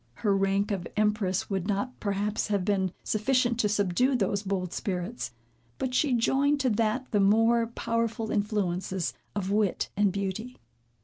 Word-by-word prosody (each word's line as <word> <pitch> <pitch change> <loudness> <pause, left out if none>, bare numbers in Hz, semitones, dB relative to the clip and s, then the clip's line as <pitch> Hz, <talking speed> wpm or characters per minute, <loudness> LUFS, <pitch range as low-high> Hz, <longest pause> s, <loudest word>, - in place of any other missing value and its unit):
Her 200 -1 +4
rank 195 +1 +1
of 185 -4 -2
empress 210 -3 +1
would 190 -1 -1
not, 210 +5 -2
perhaps, 205 +1 -1
have 200 -3 0
been 190 -3 +1
sufficient 240 +2 +1
to 210 - +2
subdue 205 +6 +2
those 200 -3 0
bold 190 -3 -2
spirits; 185 - -3 0.5
but 260 -1 -2
she 270 +1 +2
joined 275 +5 +2
to 255 -2 +2
that 225 +4 0
the 210 - +2
more 225 +4 +4
powerful 230 -1 -2
influences 190 -4 -1 0.2
of 195 -1 -2
wit 205 -2 +1
and 205 -1 +3
beauty. 200 +6 -4
210 Hz, 150 wpm, -28 LUFS, 195-230 Hz, 0.5 s, Her